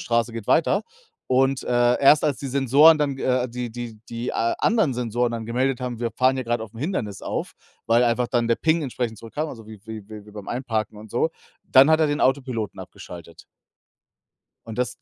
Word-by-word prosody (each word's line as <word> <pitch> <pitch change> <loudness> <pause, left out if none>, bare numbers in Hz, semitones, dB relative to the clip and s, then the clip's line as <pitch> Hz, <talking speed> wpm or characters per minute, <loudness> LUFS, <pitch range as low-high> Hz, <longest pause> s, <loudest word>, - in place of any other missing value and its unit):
Straße 115 0 0
geht 115 -3 -7
weiter. 195 +6 +3 0.5
Und, 135 +1 +2
äh, 120 0 +2
erst 150 +3 +6
als 145 -3 0
die 140 - -5
Sensoren 140 +4 +5
dann, 145 -2 0
äh 130 -1 0
die 120 0 -5
die 115 -2 -8
die 120 +1 -4
a 115 +1 +1
anderen 215 - +2
Sensoren 120 0 -1
dann 115 -1 -5
gemeldet 130 +2 0
haben, 125 -2 -4
wir 115 -1 -1
fahren 130 +4 +2
hier 130 - -2
grad 120 0 -1
auf 110 0 -9
'n - - -10
Hindernis 125 - -3
auf, - - -4 0.3
weil 115 +1 +4
einfach 120 0 +1
dann 120 -1 0
der 115 - +3
Ping 160 0 +1
entsprechend 120 -4 -3
zurückkam 145 +9 -5
also 115 -5 -10
wie 110 -1 -12
wie 110 -2 -8
wie 105 -1 -10
wie - - -13
beim 105 -2 -9
Einparken 115 -4 -3
und 110 +1 -11
so, 120 +9 0 0.3
dann 135 +3 +6
hat 160 0 +4
er 155 - +3
den 145 0 -1
Autopiloten 130 -5 -1
abgeschaltet. 85 -1 -11 1.2
Und 110 0 -7
das, 125 - -1
120 Hz, 210 wpm, -23 LUFS, 115-135 Hz, 1.2 s, erst